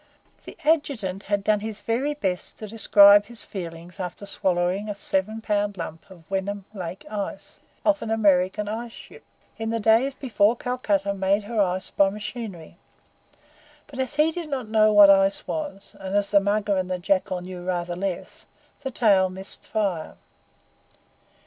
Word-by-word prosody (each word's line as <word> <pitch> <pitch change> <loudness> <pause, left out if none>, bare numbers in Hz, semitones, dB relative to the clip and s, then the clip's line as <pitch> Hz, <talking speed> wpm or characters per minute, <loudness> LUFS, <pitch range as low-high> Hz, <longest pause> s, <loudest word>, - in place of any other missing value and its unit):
The - - -11
Adjutant 270 - 0
had 205 -1 +1
done 210 0 +2
his 215 0 -6
very 265 +6 -1
best 185 -10 -3
to 215 - -7
describe 205 -1 +6
his 235 -2 -3
feelings 175 0 -8
after 180 +2 -5
swallowing 190 +1 -1
a 205 - -3
seven 200 +2 -2
pound 205 -2 -1
lump 165 +1 -7
of 180 -3 -15
Wenham 195 0 -3
Lake 185 -2 -7
ice, 205 -2 -6 0.3
off 300 -1 +3
an 225 - -4
American 200 -2 +2
ice 230 +2 -4
ship, - - -13 0.4
in 225 0 -2
the 230 0 -1
days 225 +5 +3
before 225 -4 +2
Calcutta 205 -6 -1
made 195 +1 +1
her 220 0 -1
ice 185 -1 -1
by 195 -1 +3
machinery; 205 -5 -7 1.1
but 270 -3 -11
as 260 +2 -2
he 305 +2 +3
did 330 -1 -6
not 260 -5 -3
know 215 0 +4
what 205 -1 +8
ice 195 0 +3
was, 295 -11 -5
and 190 +1 -4
as 205 -1 0
the 200 - +6
Mugger 205 0 0
and 185 -1 -2
the 185 - -1
Jackal 185 0 0
knew 180 0 -8
rather 175 -1 -2
less, 185 0 -5 0.3
the 270 - -3
tale 200 -7 +3
missed 190 +1 -2
fire. 195 -7 -2
200 Hz, 165 wpm, -24 LUFS, 190-225 Hz, 1.1 s, what